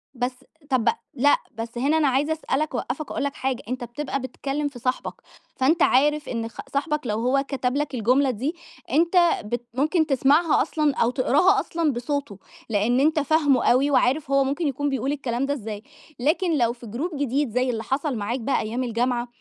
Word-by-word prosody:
بس 245 +1 -1 0.4
طب 255 -4 +2 0.2
لأ، 285 +2 +4 0.2
بس 230 +1 -6
هنا 285 +6 +2
أنا 300 -3 +3
عايزة 280 +4 +1
أسأل 300 -3 -2
لك، 310 -3 -2
أوقّفك 255 +5 -4
وأقول - - -2
لك 280 - -2
حاجة، 260 -1 -2
أنت 255 0 -3
بتبقى 265 +3 -4
بتكلّم 280 +3 -3
في 275 -4 -9
صاحبك، 255 +2 -2 0.4
فأنت 310 +6 +2
عارف 295 +3 +3
إن 230 -2 -2
خ 225 - -19
صاحبك 300 +2 0
لو 215 0 -1
هو 260 +3 +2
كتب 260 -2 -1
لك 290 0 -1
الجملة 255 +4 +2
دي 260 +9 -3 0.4
أنت 335 +6 +2 0.3
بت 240 +3 -4
ممكن 310 +6 +2
تسمعها 290 +4 +3
أصلًا 305 -3 0
أو 230 - +2
تقراها 330 +10 +3
أصلًا 330 -5 0
بصوته، 250 -3 -3 0.3
لإن 225 +4 +2
أنت 310 +2 +3
فاهمه 290 -3 +2
أوي 270 +4 +3
وعارف 275 +2 +2
هو 275 0 +4
ممكن 285 +4 -1
يكون 285 +1 -1
بيقول 270 0 -1
الكلام 265 -3 -2
ده 285 - 0
إزاي. 215 -5 -6 0.4
لكن 315 +5 +1
لو 235 -3 +2
في 240 0 -13
جروب 275 - -3
جديد، 280 0 0
زي 250 +3 0
اللي 225 -2 -2
حصل 275 +4 -1
معاك 220 +5 -2
بقى 260 +4 0
أيام 235 +4 -3
الجامعة، 240 +1 -1
270 Hz, 190 wpm, -24 LUFS, 245-295 Hz, 0.4 s, لأ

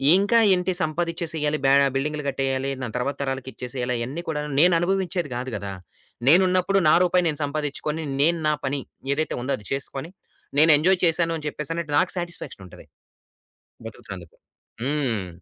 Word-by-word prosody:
ఇంకా 205 +5 +4
ఏంటి 180 0 0
సంపాదిచ్చేసేయాలి 160 -2 -1
బె 135 - +5 0.2
బిల్డింగ్లు 150 +2 -2
కట్టేయాలి, 135 0 -1
నా 125 - -3
తర్వాత 135 +3 -2
తరాలకిచ్చేసేయాలి, 130 -1 -4
అయన్నీ 135 +9 -4
కూడాను 150 -1 -3
నేననుభవించేది 175 -2 +1
కాదు 125 +1 -4
గదా! 100 -1 -6 0.5
నేనున్నప్పుడు 185 +4 +4
నా - - +6
రూపాయి 180 0 +2
నేను 150 - -3
సంపాదిచ్చుకొని 150 +2 -3 0.2
నేను 170 +3 +3
నా 150 - +3
పని 140 +1 -1 0.3
ఏదైతే 155 +2 -1
ఉందో 130 +3 -3
అది 105 - -15
చేసుకొని 135 +3 -4 0.5
నేను 160 +2 +7
ఎంజాయ్ 180 +4 +3
చేశాను 165 0 +2
అని 150 - -9
చెప్పేసని 150 +3 -4
అంటే 150 - -10
నాకు 185 - +1
సాటిస్‌ఫాక్షనుంటది 170 - -7 1.0
బతుకుతున్నందుకు. 95 -6 -10 0.5
హ్మ్. 130 -9 -1
150 Hz, 140 wpm, -24 LUFS, 135-170 Hz, 1.0 s, నేను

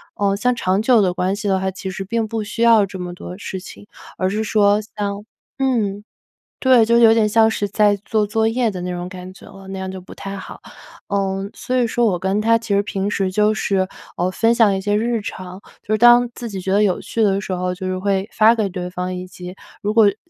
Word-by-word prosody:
呃， 200 -1 +1
像 250 +4 +1
长 190 -3 0
久 230 0 +4
的 185 -3 +1
关 185 +2 -1
系 210 0 -4
的 190 -1 +2
话， 190 0 -1
其 190 +1 -6
实 190 +1 -5
并 225 +2 -1
不 220 0 -3
需 220 +3 -6
要 225 -3 +6
这 190 -1 -9
么 180 -1 -5
多 180 0 -9
事 190 -2 -5
情。 205 +2 -12 0.3
而 185 - 0
是 215 +3 -1
说 205 -1 +3 0.2
像 205 -1 -3 0.4
嗯， 215 -7 0 0.6
对， 255 -4 +5
就 235 - +2
是 235 - +5
有 225 -1 +8
点 220 -2 +3
像 220 +1 +4
是 205 -2 -2
在 205 0 +3
做 215 -2 +1
作 220 +1 0
业 235 0 +1
的 185 -3 -6
那 180 - -4
种 175 0 -5
感 185 0 -9
觉 - - -16
了， 195 -1 -13
那 195 0 -6
样 190 0 -4
就 190 0 -7
不 185 - -13
太 195 0 -7
好。 - - -10 0.5
嗯， 195 0 -2
所 255 - -4
以 250 - +3
说 240 +1 0
我 195 -5 +1
跟 190 +3 0
他 230 +1 +3
其 230 -2 -5
实 200 - +4
平 200 0 -2
时 195 -2 -1
就 210 +2 +3
是， 190 -3 0 0.3
呃， 180 +1 0
分 225 +5 +2
享 220 -5 +4
一 - - -3
些 205 +2 0
日 230 +1 0
常， 185 -1 -8 0.2
就 215 - -4
是 215 - +1
当 240 +1 +6
自 235 - -6
己 195 -2 -5
觉 190 - -4
得 205 - +4
有 185 -3 +1
趣 225 - -2
的 195 -1 +2
时 195 - -5
候， 180 0 -2
就 185 0 -6
是 185 0 -2
会 195 +1 -1
发 220 +2 +5
给 215 -3 -1
对 180 -1 -5
方， 180 0 -4
以 180 0 -6
及 180 0 -10 0.3
如 210 0 0
果 225 -2 +6
时 200 - -12
200 Hz, 270 characters per minute, -20 LUFS, 190-220 Hz, 0.6 s, 有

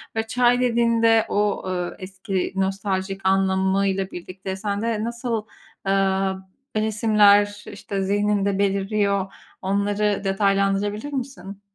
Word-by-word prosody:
ve 225 0 -1
çay 245 +1 +3
dediğinde 230 -2 +3
o, 205 0 0
eee, 180 -1 -3
eski 190 0 -3
nostaljik 195 0 -2
anlamıyla 190 0 +1
birlikte 190 +2 -6
sende 210 +2 -2
nasıl, 235 -1 -3 0.4
eee, 195 0 +2 0.4
resimler, 210 -1 +3
işte, 200 -1 -4
zihninde 200 0 +1
beliriyor 200 0 0 0.3
onları 200 +1 0
detaylandırabilir 200 +5 0
misin? 205 -8 -6
200 Hz, 95 wpm, -23 LUFS, 195-215 Hz, 0.4 s, çay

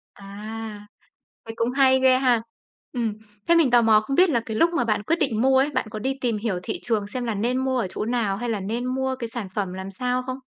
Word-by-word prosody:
À. 210 +1 -8 0.6
Vậy 225 - -7
cũng 230 +1 0
hay 260 0 +4
ghê 260 -1 +5
ha! 250 -4 +2 0.5
Ừm, 235 -3 -1 0.3
thế 340 - +5
mình 330 -6 +4
tò 240 0 +5
mò 220 -1 +5
không 275 +6 -3
biết 370 +1 +6
là 240 -5 +2
cái 220 - -4
lúc 330 +8 +4
mà 335 - +1
bạn 215 -3 0
quyết 325 +11 +1
định 240 -9 0
mua 265 0 +4
ấy, 275 +3 +2
bạn 260 -5 -2
có 215 - -5
đi 265 +5 -2
tìm 235 -4 0
hiểu 205 -4 -2
thị - - -3
trường 215 -4 0
xem 245 +4 -4
là 230 -2 -2
nên 235 +5 0
mua 260 0 0
ở 230 - 0
chỗ - - -3
nào, 225 -4 0
hay 240 +4 -4
là 220 -3 -1
nên 225 +6 -3
mua 265 +1 -1
cái 235 -3 -4
sản 225 -4 -5
phẩm 195 -3 -2
làm 190 +1 -6
sao 250 +5 -1
không? 255 0 -5
235 Hz, 265 wpm, -24 LUFS, 215-260 Hz, 0.6 s, biết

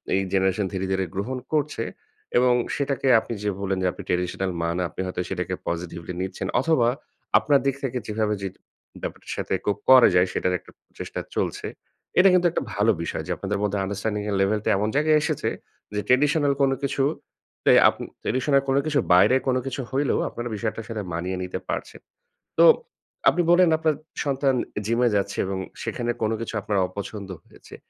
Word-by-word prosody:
এই 95 - +2
জেনারেশন 95 +1 +2
ধীরে, 95 0 -2
ধীরে 95 0 +1
গ্রহণ 115 +7 -2 0.2
করছে। 150 -6 0 0.5
এবং 125 0 +5 0.2
সেটাকে 140 -1 -1
আপনি 110 - -6
যে 105 - +1
বললেন 95 -1 -1
যে, 90 - +2
আপনি - - -9
ট্র্যাডিশনাল 90 +1 -1
মা 85 - 0
না। 90 - 0
আপনি 75 - -6
হয়তো 90 -1 -3
সেটাকে 90 -1 -2
পজিটিভলি 85 0 -4
নিচ্ছেন 95 0 -4
অথবা 135 -5 +3 0.5
আপনার 145 -2 +3
দিক 135 -1 +1
থেকে 130 -2 -2
যেভাবে 105 0 0
যে 100 - -2 0.5
ব্যাপারটার - - -6
সাথে - - -2
কোপ 100 -1 +1
করা 130 -2 +9
যায় 90 +1 +5
সেটার 90 - 0
একটা - - -18
প্রচেষ্টা - - -7 0.2
চলছে। - - -2 0.5
এটা 190 +2 +7
কিন্তু 180 -1 +4
একটা - - -2
ভালো 105 +3 +3
বিষয়। - - -3
যে, - - -3
আপনাদের 100 +1 -2
মধ্যে 105 0 0
আন্ডারস্ট্যান্ডিং 100 +2 -2
এর 100 - 0
লেভেল 105 +2 +2
টা - - +2
এমন 105 +2 0
জায়গায় 155 +1 +4
এসেছে - - -1 0.4
যে, 105 - -1
ট্র্যাডিশনাল 145 +2 +3
কোন 135 -1 +4
কিছু 140 0 0 0.6
তে - - +6 0.2
আপনি - - -6 0.2
ট্র্যাডিশনাল 135 +2 +2
কোন 135 - +3
কিছু 150 -2 +1
বাইরে 90 +8 +6
কোন 130 - +3
কিছু 135 +1 -3
হইলেও 135 +1 +1
আপনারা 120 0 -5
বিষয়টার 110 +2 -3
সাথে 110 -2 -3
মানিয়ে 90 +3 -2
নিতে 90 - -4
পারছেন। - - -4 0.6
তো, - - +8 0.6
আপনি 175 - +1
বললেন 175 0 +6
আপনার 155 -1 +1 0.3
সন্তান 135 -1 +1 0.3
জিমে 115 +3 +2
যাচ্ছে 100 0 -1
এবং 95 0 -3 0.3
সেখানে 120 -1 -2
কোন 110 0 +1
কিছু 115 - -5
আপনার 100 0 -1
অপছন্দ 100 +1 -7 0.2
হয়েছে। - - -15
110 Hz, 180 wpm, -24 LUFS, 95-135 Hz, 0.6 s, করা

